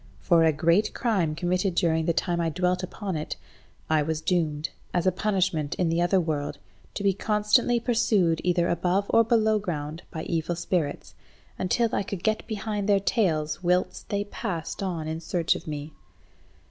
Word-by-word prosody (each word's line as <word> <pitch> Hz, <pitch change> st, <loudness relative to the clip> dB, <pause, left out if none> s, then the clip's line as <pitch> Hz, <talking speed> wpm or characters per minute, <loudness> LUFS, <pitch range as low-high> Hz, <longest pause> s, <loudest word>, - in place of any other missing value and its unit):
For 165 Hz, -, +4 dB
a 160 Hz, -, +5 dB
great 170 Hz, +7 st, +2 dB
crime 190 Hz, -10 st, 0 dB
committed 180 Hz, +2 st, 0 dB
during 160 Hz, -2 st, +2 dB
the 170 Hz, -, +3 dB
time 170 Hz, +1 st, 0 dB
I 165 Hz, -, +1 dB
dwelt 180 Hz, +2 st, 0 dB
upon 190 Hz, 0 st, -4 dB
it, 155 Hz, 0 st, -3 dB, 0.5 s
I 155 Hz, -1 st, +3 dB
was 155 Hz, +1 st, -1 dB
doomed, 160 Hz, -3 st, -1 dB, 0.2 s
as 175 Hz, -, +1 dB
a 185 Hz, -, +4 dB
punishment 185 Hz, -6 st, 0 dB
in 175 Hz, -2 st, +1 dB
the 165 Hz, +1 st, +1 dB
other 175 Hz, +2 st, +3 dB
world, 150 Hz, -4 st, -2 dB, 0.4 s
to 205 Hz, -, -3 dB
be 200 Hz, -1 st, +3 dB
constantly 210 Hz, +4 st, +2 dB
pursued 220 Hz, -8 st, +2 dB
either 175 Hz, -1 st, +2 dB
above 180 Hz, +3 st, +1 dB
or 230 Hz, -, +7 dB
below 220 Hz, -2 st, +3 dB
ground 160 Hz, -4 st, -4 dB
by 160 Hz, -3 st, -5 dB
evil 165 Hz, +1 st, -1 dB
spirits, 170 Hz, -3 st, -2 dB, 0.5 s
until 225 Hz, +5 st, +1 dB
I -, -, +1 dB
could 195 Hz, -2 st, -5 dB
get 220 Hz, 0 st, 0 dB
behind 210 Hz, -2 st, -3 dB
their 200 Hz, -1 st, +5 dB
tails 180 Hz, -6 st, 0 dB
whilst 180 Hz, +1 st, 0 dB
they 200 Hz, 0 st, 0 dB
passed 170 Hz, -5 st, -5 dB
on 170 Hz, -5 st, -3 dB
in 160 Hz, +1 st, -3 dB
search 170 Hz, 0 st, +1 dB
of -, -, -8 dB
me. 150 Hz, 0 st, -5 dB
175 Hz, 175 wpm, -26 LUFS, 160-200 Hz, 0.5 s, or